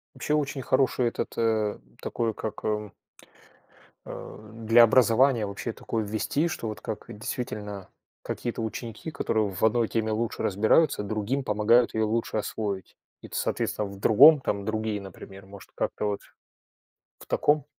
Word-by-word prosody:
Вообще 150 - -2
очень 145 -2 0
хороший 130 -1 +2
этот, - - -4
э, 110 -2 +1 0.2
такой 115 -2 -2
как, 110 - -6
э 105 -2 -2 1.1
э, 105 0 -9
для 115 +1 +5
образования 120 0 +4
вообще 100 +3 -5
такое 110 -1 -3
ввести, 110 +10 -1
что 115 -8 -4
вот 110 - -6
как 110 -1 -5
действительно 105 -3 -5 0.3
какие-то 120 -1 -4
ученики, 115 +6 -5
которые 110 -7 0
в 95 - -6
одной 110 +1 +3
теме 110 -1 -1
лучше 115 +1 -2
разбираются, 105 - +3
другим 110 +6 -2
помогают 115 +2 +3
ее 110 - +1
лучше 110 0 -1
освоить. 100 -3 -4 0.3
И, - - -10
т - - -9
соответственно, 105 - -1
в 100 0 -10
другом, 140 +8 +7
там, 100 -4 -2
другие, 110 -1 -2
например. 95 0 -11
Может, 100 0 -13
как-то, - - -2
вот, 105 -1 -2 1.0
в - - -13
таком? 150 -1 +2
110 Hz, 150 wpm, -27 LUFS, 105-120 Hz, 1.1 s, другом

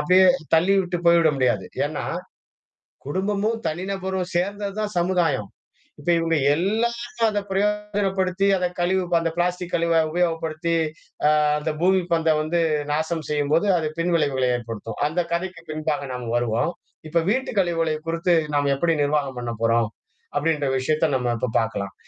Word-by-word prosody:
அப்படியே 185 +4 +5 0.3
தள்ளி 180 +5 +4
விட்டு 175 -1 -2
போய்விட 170 -2 +6
முடியாது. 120 -7 +1 0.2
ஏன்னா - - -4 1.0
குடும்பமும், 205 +7 0
தனிநபரும் 185 +2 -2
சேர்ந்தது 200 +3 -1
தான் 210 -1 -2
சமுதாயம். 170 - +1 0.5
இப்ப 145 - -4
இவுங்க 165 -1 +1 0.2
எல்லாரும் 235 +5 0
அத 210 -1 -1
பிரயோகப்படுத்தி 195 -2 0
அத 180 - 0
கழிவு 185 +1 +1 0.2
அந்த 165 -1 -1
பிளாஸ்டிக் 180 0 -1
கழிவ 165 -1 +3
உபயோகப்படுத்தி, 165 -1 -1 0.5
அ - - +6 0.3
அந்த 155 +1 -2
பூமி 190 +1 +4
பந்த 165 -1 +3
வந்து 170 +2 0 0.3
நாசம் 160 +1 -1
செய்யும்போது 150 +6 +1
அது 155 -2 -1
பின்விளைவுகளை 145 -7 +1
ஏற்படுத்தும். 115 -2 -7
அந்த 160 +4 -2
கதைக்கு 170 -1 -3
பின்பாக 155 -2 -2
நாம 125 -2 -5
வருவோம். 120 +6 0 0.4
இப்ப 170 +1 +2
வீட்டு 260 +4 0
கழிவுகளை 165 -3 +1
குறித்து 170 +1 +2 0.2
நாம 145 -1 +2
எப்படி 165 +2 +2
நிர்வாகம் 145 -3 0
பண்ண 120 -1 -3
போறோம்? 115 -1 +2 0.5
அப்படின்ற 145 -1 +1
விஷயத்த 155 +5 +1
நம்ம 125 -2 0
இப்ப 115 +1 -2
பார்க்கலாம். 100 -4 -3
165 Hz, 140 wpm, -23 LUFS, 145-185 Hz, 1.0 s, போய்விட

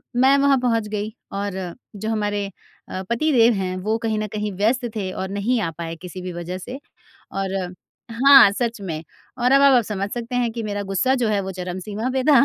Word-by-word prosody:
मैं 265 +3 +5
वहाँ 280 -1 +4
पहुँच 230 -3 +1
गई 210 +1 -3 0.2
और 200 -1 -3 0.4
जो 215 +2 -4
हमारे 205 -2 -1 0.4
अ, 185 - -4
पति 305 +7 +1
देव 235 -2 +5
हैं 185 -2 -2
वो 215 +2 +1
कहीं 220 -1 0
न 215 - -2
कहीं 210 0 -3
व्यस्त 240 +5 +1
थे 190 -3 -2
और 190 0 -4
नहीं 210 +5 0
आ 165 - -1
पाए 165 -1 -5
किसी 185 0 -8
भी 180 -1 -5
वजह 175 +2 -5
से। 250 +8 -7 0.5
और 195 0 -2 0.6
हाँ, 265 -2 +8
सच 230 0 -2
में 165 -4 -4 0.4
और 250 +2 +3
अब 275 - +6
आप 270 -3 +6
समझ 200 -1 -3
सकते 240 +1 -4
हैं 240 -2 +1
कि 230 -1 -5
मेरा 205 -1 -3
गुस्सा 225 +8 +2
जो 240 -3 0
है 205 - +2
वो 190 0 -4
चरम 180 0 -5
सीमा 215 +6 -3
पे 260 -1 0
था 275 - +7
215 Hz, 215 wpm, -22 LUFS, 195-245 Hz, 0.6 s, हाँ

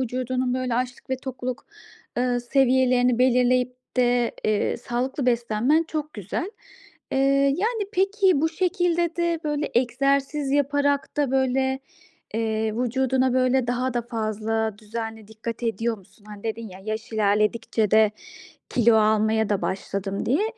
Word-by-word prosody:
vücudunun 255 0 -1
böyle 255 -2 -1
açlık 250 +1 -3
ve 260 - +1
tokluk, 255 -1 -6 0.5
eee, 245 0 +1
seviyelerini 250 -1 +3
belirleyip 250 0 +3 0.2
de, 245 -1 +2
eee, 215 -1 +1
sağlıklı 250 +3 -3
beslenmen 240 +5 +2
çok 305 -1 -4
güzel. 210 - -4 0.6
Eee, - - +1 0.4
yani, 440 +1 0
peki, 390 -4 +3
bu 320 - +2
şekilde 345 -1 0
de 340 -1 0
böyle 295 0 -1
egzersiz 275 +3 +1
yaparak 285 0 +1
da, 290 -3 +1
böyle, 265 0 +1 0.5
eee, 220 -1 -1
vücuduna, 260 +1 +1
böyle, 255 0 +2
daha 250 +1 -1
da 240 - 0
fazla 220 -1 -2
düzenli 220 0 -6
dikkat 220 +2 -6
ediyor 225 0 -1
musun? 200 +2 -22
Hani, 205 -1 -10
dedin 225 0 -4
ya, 185 -1 -11
"Yaş 220 +1 -5
ilerledikçe 215 +1 +1
de 215 -1 +5 0.6
kilo 235 -2 +4
almaya 220 0 +3
da 205 -2 0
başladım." 195 +1 -3
diye. 295 - +2
245 Hz, 135 wpm, -24 LUFS, 220-270 Hz, 0.6 s, de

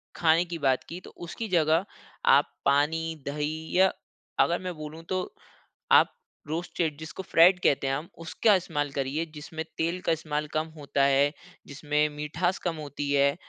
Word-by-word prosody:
खाने 165 +1 +3
की 175 -1 -5
बात 135 -2 +2
की, 175 +2 -6
तो - - -12
उसकी 195 +6 -6
जगह 165 +1 +3 0.4
आप - - +5
पानी, 160 +4 +2
दही 155 +3 -3
या 190 0 +6 0.5
अगर 170 - 0
मैं 180 -1 -4
बोलूँ 155 +1 -8
तो 185 -1 -2 0.6
आप - - +6 0.3
रोस्टेड 160 -1 -2
जिसको 160 +4 -7
फ्राइड़ 175 +2 +6
कहते 135 -1 +2
हैं 135 - +1
हम, 155 +5 -6
उसका 170 +6 +2
इस्तेमाल 145 -6 -2
करिए 140 +4 -2
जिसमें 160 +1 -6
तेल 170 +3 -1
का - - +3
इस्तेमाल 150 -1 -3
कम 155 +1 0
होता 140 -1 0
है, 140 +1 +3 0.3
जिसमें 150 +1 0
मिठास 165 +5 -1
कम 170 - -1
होती 145 -1 -4
है। 140 0 +3
160 Hz, 165 wpm, -27 LUFS, 145-170 Hz, 0.6 s, या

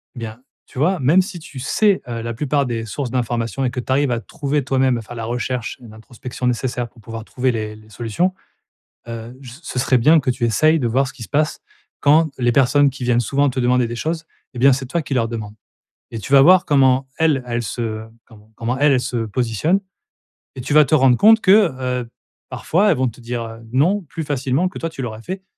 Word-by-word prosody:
Bien, 115 -1 -7 0.3
tu - - -16
vois, 175 +6 +1
même 150 +8 +4
si 185 -2 -8
tu 150 -4 -10
sais, 200 +9 +2
heu, 115 -1 -4
la 115 +1 -4
plupart 140 +3 0
des 115 -2 -3
sources 125 +4 -4
d'information 120 +1 -2
et 125 - 0
que 125 - -4
tu 125 - -5
arrives 135 -1 +2
à 120 - 0
trouver 145 +2 -2
toi-même, 130 -1 +1
à - - -6
faire 115 +2 -10
la 115 -1 -5
recherche 120 0 -3
et 120 - -11
l'introspection 120 +3 -8
nécessaire, 120 0 -1
pour 115 - -20
pouvoir 115 +1 -8
trouver 130 +2 -1
les 110 -2 -4
les 110 0 -17
solutions, 120 - -1 0.8
heu, 115 +2 -7
je 130 -3 -11
ce 130 - -14
ce 130 - -4
serait 130 -1 +3
bien 155 +7 +5
que 130 - -1
tu 120 -1 -2
essayes 155 +8 +3
de 125 - -1
voir 130 +3 +1
ce - - -9
qui 120 -5 -9
se - - -13
passe, 150 +1 0 0.4
quand 155 +2 +4
les 120 -1 +2
personnes 140 +3 +4
qui 135 0 -10
viennent 120 -1 +2
souvent 140 +5 +1
te 130 - -6
demander 125 0 +2
des 120 - -5
choses 160 +5 -3 0.3
et - - -7
bien, 135 +2 +6
c'est 130 0 -2
toi 170 +5 -2
qui 135 -1 -4
leur 120 -3 +1
demandes 110 -2 -6 0.6
et 115 - -5
tu 135 - -8
vas 135 - +8
voir 180 +5 +6
comment 135 -2 +3
elles, 155 -5 +2
elles 120 0 -2
se 110 -1 -4 0.2
comment 110 -1 -19
comment 120 +2 -2
elles, 145 0 +4
elles 130 - +3
se 120 -2 -2
positionnent 120 - 0 0.8
et 130 - -6
tu 130 - -3
vas 155 -1 +7
te 155 - -3
rendre 130 -4 +5
compte 220 +1 +6
que, 200 -2 +5 0.3
heu, 120 - -10 0.4
parfois, 200 +5 +1
elles - - +1
vont 130 0 +1
te 120 - -8
dire, 120 0 -4
heu: 115 0 -9
«Non», 175 +11 +2
plus 165 - -5
facilement 140 +4 0
que - - -10
toi 165 - -3
tu 150 -4 -8
l'aurais 110 -3 -5
fait 190 +5 -6
130 Hz, 235 wpm, -20 LUFS, 115-145 Hz, 0.8 s, vas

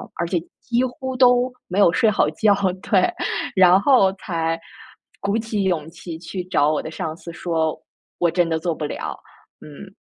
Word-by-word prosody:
而 170 - -2
且 175 - 0 0.2
几 245 +1 0
乎 260 +1 -4
都 250 0 +4 0.2
没 185 +3 -1
有 175 - +6
睡 220 +4 +3
好 150 -7 +2
觉， 205 +6 +3 0.3
对， 190 -3 +3 0.4
然 185 +1 +6
后 200 -7 +4
才 165 -4 -2 0.6
鼓 200 +2 -1
起 220 -3 -2
勇 165 -4 -1
气 170 -1 -8
去 180 +2 -5
找 150 -5 +2
我 155 - 0
的 - - -7
上 160 0 -4
司 170 - -9
说： 160 -2 -1 0.4
“我 175 - +3
真 175 -1 +2
的 160 -1 0
做 170 0 -1
不 150 - -4
了。” - - -5 0.4
嗯。 185 +6 -12
180 Hz, 190 characters per minute, -22 LUFS, 165-210 Hz, 0.6 s, 有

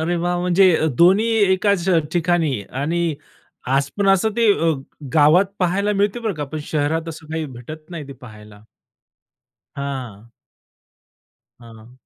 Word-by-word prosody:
अरे 170 +2 -1
वाह! 175 +1 -1
म्हणजे 180 0 +4 0.2
दोन्ही 190 +6 +5 0.3
एकाच 190 -1 +1 0.2
ठिकाणी 165 - 0
आणि 160 +4 -1 0.6
आज 140 0 0
पण 200 -1 +1
असं 195 +3 +3
ते 235 -1 +3 0.7
गावात 155 +5 +5
पहायला 200 +3 0
मिळते 205 +3 0
बरं 220 -4 -2
का 150 -2 -4
पण 155 - -3
शहरात 160 +2 -1
असं 160 -1 -9
काही 160 0 -2
भेटत 150 +5 -11
नाही, 160 -5 -7
ते - - -7
पाहायला. 105 -5 -14 1.1
हां. 125 -6 -6 1.3
हां. 115 -1 -15
165 Hz, 130 wpm, -20 LUFS, 140-180 Hz, 1.3 s, दोन्ही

